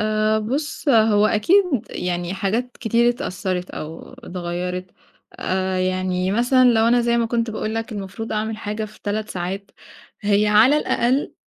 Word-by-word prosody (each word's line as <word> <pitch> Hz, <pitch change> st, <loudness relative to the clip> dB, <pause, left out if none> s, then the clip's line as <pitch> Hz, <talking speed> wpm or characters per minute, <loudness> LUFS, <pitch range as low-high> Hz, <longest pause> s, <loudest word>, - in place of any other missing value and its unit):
آآ 215 Hz, 0 st, +1 dB
بُص، 280 Hz, +8 st, -3 dB
هو 215 Hz, -4 st, +5 dB
أكيد 335 Hz, -, +4 dB, 0.3 s
يعني 175 Hz, 0 st, -3 dB
حاجات 225 Hz, +6 st, -2 dB
كتير 235 Hz, +1 st, +3 dB
اتأثّرِت 185 Hz, -7 st, -3 dB
أو 160 Hz, +2 st, -8 dB
اتغيّرِت. 180 Hz, +1 st, -5 dB, 0.5 s
آآ، 185 Hz, 0 st, -1 dB
يعني 185 Hz, 0 st, 0 dB
مثلًا 250 Hz, +3 st, +4 dB
لو 225 Hz, 0 st, +3 dB
أنا 240 Hz, +1 st, +4 dB
زي 235 Hz, 0 st, +1 dB
ما 230 Hz, -, +1 dB
كنت 230 Hz, 0 st, -1 dB
باقول 220 Hz, 0 st, -3 dB
لك 225 Hz, +1 st, -3 dB
المفروض 200 Hz, +2 st, -6 dB
أعمل 215 Hz, +1 st, -2 dB
حاجة 215 Hz, 0 st, -4 dB
في 215 Hz, 0 st, -13 dB
3 215 Hz, +1 st, -2 dB
ساعات، 190 Hz, +3 st, -4 dB, 0.5 s
هي 205 Hz, 0 st, +2 dB
على 220 Hz, +7 st, +5 dB
الأقل 260 Hz, -1 st, 0 dB
215 Hz, 150 wpm, -21 LUFS, 185-235 Hz, 0.5 s, هو